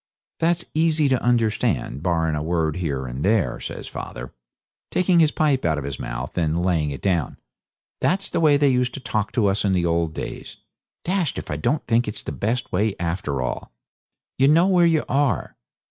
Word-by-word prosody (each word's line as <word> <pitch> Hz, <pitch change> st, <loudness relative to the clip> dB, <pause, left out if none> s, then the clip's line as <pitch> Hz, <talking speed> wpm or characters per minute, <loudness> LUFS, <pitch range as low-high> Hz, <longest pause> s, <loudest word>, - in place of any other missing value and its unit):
'That's 170 Hz, +1 st, +1 dB
easy 160 Hz, -1 st, +2 dB
to 130 Hz, -3 st, +1 dB
understand, 110 Hz, -, 0 dB
barrin' 80 Hz, -2 st, +1 dB
a 75 Hz, -, -1 dB
word 80 Hz, -1 st, 0 dB
here 70 Hz, -7 st, -2 dB
and 65 Hz, +3 st, -5 dB
there,' 105 Hz, -1 st, +1 dB
says -, -, -7 dB
father, -, -, -7 dB, 0.6 s
taking 180 Hz, -1 st, +3 dB
his 160 Hz, -2 st, +5 dB
pipe 145 Hz, -3 st, +1 dB
out 80 Hz, -2 st, +1 dB
of 75 Hz, -, -3 dB
his 70 Hz, -2 st, -5 dB
mouth -, -, -5 dB
and 85 Hz, +1 st, 0 dB
laying 80 Hz, -5 st, +1 dB
it 70 Hz, -, -7 dB
down; 90 Hz, -6 st, 0 dB, 0.6 s
'that's 195 Hz, +2 st, +1 dB
the -, -, 0 dB
way 150 Hz, -3 st, +5 dB
they 145 Hz, -1 st, +3 dB
used 125 Hz, -1 st, +1 dB
to -, -, -5 dB
talk 110 Hz, -4 st, -2 dB
to 115 Hz, -, +1 dB
us 100 Hz, 0 st, +1 dB
in 100 Hz, -2 st, +2 dB
the 90 Hz, -2 st, +1 dB
old 85 Hz, -2 st, 0 dB
days. -, -, -7 dB, 0.5 s
Dashed 180 Hz, -4 st, 0 dB
if -, -, -5 dB
I -, -, -1 dB
don't 140 Hz, -, -1 dB
think 115 Hz, +1 st, +2 dB
it's 105 Hz, 0 st, -4 dB
the -, -, -5 dB
best 120 Hz, +4 st, -2 dB
way 105 Hz, +2 st, +1 dB
after 85 Hz, -6 st, -2 dB
all. 65 Hz, -, -5 dB, 0.7 s
You 135 Hz, -, +5 dB
know 165 Hz, +4 st, +5 dB
where 180 Hz, -3 st, +4 dB
you 160 Hz, -2 st, +2 dB
are. 135 Hz, -, 0 dB
105 Hz, 195 wpm, -23 LUFS, -, 0.7 s, his